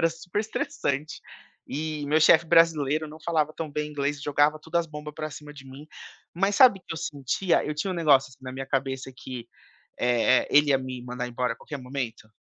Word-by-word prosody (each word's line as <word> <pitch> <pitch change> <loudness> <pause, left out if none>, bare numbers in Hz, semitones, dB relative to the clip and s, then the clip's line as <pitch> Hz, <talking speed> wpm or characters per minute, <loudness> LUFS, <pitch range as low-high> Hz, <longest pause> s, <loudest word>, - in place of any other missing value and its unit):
era 165 - +4
super 175 +5 -4
estressante. 150 -8 -3 0.5
E 155 0 -4
meu 155 +2 +3
chefe 160 +1 +6
brasileiro, 155 -2 +3
não 155 +1 -11
falava 155 -1 0
tão 160 -2 -5
bem 150 +1 -3
inglês, 145 0 -2
jogava 145 +1 +2
tudo 160 +2 -5
as 170 -1 +2
bomba 150 -1 -8
para 155 0 -5
cima 150 0 -10
de 135 -2 -12
mim. 140 +3 -12 0.5
Mas 195 +3 +1
sabe 245 -7 +7
o - - -25
que 165 - -7
eu - - -7
sentia? 145 +7 0
Eu 150 - -3
tinha 185 +6 -2
um - - -2
negócio, 145 -6 +4
assim, 130 0 -18
na 130 - -6
minha 135 0 -6
cabeça 135 -1 -2
que, 125 -3 -8 0.5
eh 125 +1 +3
eh, - - -10
ele 145 +1 +6
ia 135 - +5
me 130 -1 -6
mandar 125 0 -4
embora 125 0 -1
a - - -18
qualquer 150 - -7
momento. 125 -4 -5
150 Hz, 215 wpm, -26 LUFS, 130-160 Hz, 0.5 s, sabe